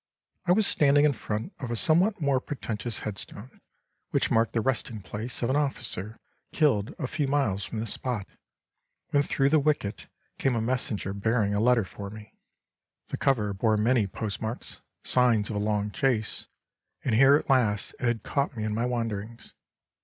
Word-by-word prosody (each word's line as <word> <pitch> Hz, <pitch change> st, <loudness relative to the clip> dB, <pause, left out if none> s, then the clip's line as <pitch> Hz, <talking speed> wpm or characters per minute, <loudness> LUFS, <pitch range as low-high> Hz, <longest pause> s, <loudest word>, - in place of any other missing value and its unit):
I -, -, +4 dB
was 210 Hz, +3 st, +5 dB
standing 145 Hz, -3 st, +5 dB
in 150 Hz, -, +4 dB
front 105 Hz, -1 st, -4 dB
of 125 Hz, -, -5 dB
a 120 Hz, -, -1 dB
somewhat 175 Hz, -, +3 dB
more 140 Hz, -4 st, +2 dB
pretentious 120 Hz, -5 st, -4 dB
headstone, 105 Hz, +3 st, -6 dB, 0.5 s
which -, -, +1 dB
marked 115 Hz, 0 st, +2 dB
the 115 Hz, -, +1 dB
resting 115 Hz, -4 st, -2 dB
place 115 Hz, +6 st, -5 dB
of 120 Hz, -, +1 dB
an -, -, +1 dB
officer 120 Hz, -7 st, -1 dB, 0.3 s
killed 130 Hz, -10 st, +1 dB
a -, -, -3 dB
few 145 Hz, +2 st, -1 dB
miles 110 Hz, -10 st, 0 dB
from 110 Hz, +6 st, -5 dB
this 110 Hz, -1 st, -3 dB
spot, 120 Hz, -7 st, -3 dB, 0.9 s
when, 145 Hz, -, +4 dB
through 135 Hz, -1 st, +1 dB
the 155 Hz, +1 st, +4 dB
wicket, 145 Hz, -8 st, -1 dB, 0.3 s
came 135 Hz, -3 st, +1 dB
a -, -, +1 dB
messenger 115 Hz, -4 st, -2 dB
bearing 105 Hz, 0 st, +1 dB
a 100 Hz, -, +1 dB
letter 115 Hz, -1 st, +3 dB
for 100 Hz, +2 st, -8 dB
me. 105 Hz, +1 st, -11 dB, 0.8 s
The -, -, -3 dB
cover 105 Hz, -7 st, +1 dB
bore 110 Hz, +2 st, +2 dB
many 110 Hz, 0 st, +2 dB
post 100 Hz, +2 st, -5 dB
marks, 110 Hz, +2 st, -5 dB, 0.2 s
signs 120 Hz, -4 st, +3 dB
of -, -, -4 dB
a -, -, 0 dB
long 105 Hz, 0 st, 0 dB
chase, 110 Hz, 0 st, -1 dB, 0.6 s
and 125 Hz, -, +1 dB
here 135 Hz, +5 st, +7 dB
at 150 Hz, -, -1 dB
last 115 Hz, -7 st, +2 dB
it 125 Hz, -, 0 dB
had 120 Hz, -3 st, 0 dB
caught 140 Hz, -3 st, -1 dB
me 110 Hz, -, -2 dB
in 110 Hz, -1 st, -1 dB
my 115 Hz, +3 st, 0 dB
wanderings. 115 Hz, -2 st, -4 dB
115 Hz, 180 wpm, -27 LUFS, 105-135 Hz, 0.9 s, here